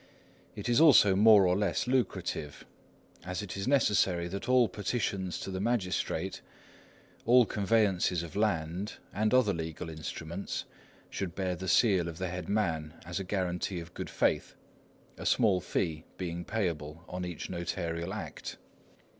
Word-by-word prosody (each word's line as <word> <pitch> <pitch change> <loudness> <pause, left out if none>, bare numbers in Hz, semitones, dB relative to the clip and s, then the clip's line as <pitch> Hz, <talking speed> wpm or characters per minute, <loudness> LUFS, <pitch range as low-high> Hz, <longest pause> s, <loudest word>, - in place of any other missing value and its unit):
It - - -5
is 120 +4 +4
also 115 -11 +7
more 105 -1 +7
or 90 0 +3
less 100 -3 0
lucrative, 125 - -2 0.6
as 90 +3 -4
it 95 -3 -6
is 95 +3 -3
necessary 105 -10 +3
that 100 +6 -5
all 125 -2 +5
petitions 100 -2 -2
to 95 - -5
the 95 - -3
magistrate, 105 -5 -1 0.9
all 125 0 +7
conveyances 100 -5 +1
of 85 +2 -9
land, 95 -1 -1 0.2
and 110 +2 +1
other 125 -6 +4
legal 80 0 -5
instruments, 80 +3 -5 0.5
should 90 -4 -4
bear 95 -2 -1
the 95 +2 -6
seal 90 -1 +4
of 85 -1 -6
the 95 0 -2
head 90 -1 -5
man, 80 -7 -1
as 90 +2 -3
a - - -3
guarantee 90 -1 -2
of 85 +1 -10
good - - -5
faith, - - 0 0.6
a - - -6
small 105 -7 +3
fee 80 -3 -2
being 85 -1 -4
payable 85 -6 -3
on 90 0 -5
each 90 -1 -5
notarial 85 0 -3
act. 110 - -6
95 Hz, 150 wpm, -30 LUFS, 85-105 Hz, 0.9 s, also